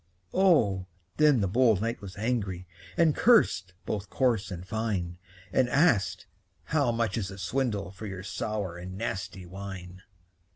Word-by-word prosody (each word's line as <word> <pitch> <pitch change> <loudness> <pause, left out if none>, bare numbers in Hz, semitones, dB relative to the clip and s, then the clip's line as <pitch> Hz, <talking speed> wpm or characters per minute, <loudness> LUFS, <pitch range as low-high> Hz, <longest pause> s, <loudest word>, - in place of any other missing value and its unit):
Oh, 115 - +3 0.3
then 150 -6 +5
the 100 - +2
bold 115 0 +4
knight 115 +2 -2
was 100 -2 -9
angry, 100 -5 -1 0.3
And 165 -3 +4
cursed 110 - +4
both 100 -2 -3
coarse 120 -6 +1
and 90 -1 -7
fine; 95 -6 -2 0.3
And 125 -2 +3
asked, 130 - +2 0.4
"How 120 - +1
much 115 0 0
is 95 - -2
the 95 0 -8
swindle 105 -4 -1
For 100 +3 -8
your 95 -2 -6
sour 100 -3 -3
and 95 +1 -7
nasty 95 -4 -4
wine?" 95 0 -8
100 Hz, 150 wpm, -28 LUFS, 95-120 Hz, 0.4 s, then